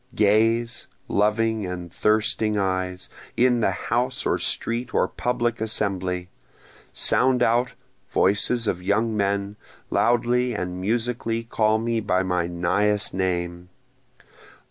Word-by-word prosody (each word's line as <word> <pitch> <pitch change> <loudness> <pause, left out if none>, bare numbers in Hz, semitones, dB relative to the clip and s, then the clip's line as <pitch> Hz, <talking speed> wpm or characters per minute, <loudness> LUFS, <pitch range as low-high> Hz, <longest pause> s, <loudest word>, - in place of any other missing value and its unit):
Gaze, 115 +3 +2 0.2
loving 110 +1 +1
and 90 -2 -6
thirsting 110 0 +1
eyes, 95 -2 -2 0.3
in 125 -1 +3
the 115 - +2
house 125 +2 -1
or - - +1
street 115 +1 -2
or - - +3
public 120 -2 -2
assembly! 95 -5 -1 0.6
Sound 125 -1 +3
out, 120 +2 +1 0.3
voices 110 +4 +2
of 90 - -1
young 110 +4 0
men! 100 0 -1 0.3
loudly 120 0 +2
and 90 -2 -4
musically 115 +2 -1
call 110 -1 +1
me 115 +1 -1
by 95 -3 0
my 90 -2 0
nighest 100 +4 +1
name! 90 -1 -2
105 Hz, 115 wpm, -24 LUFS, 95-115 Hz, 0.6 s, in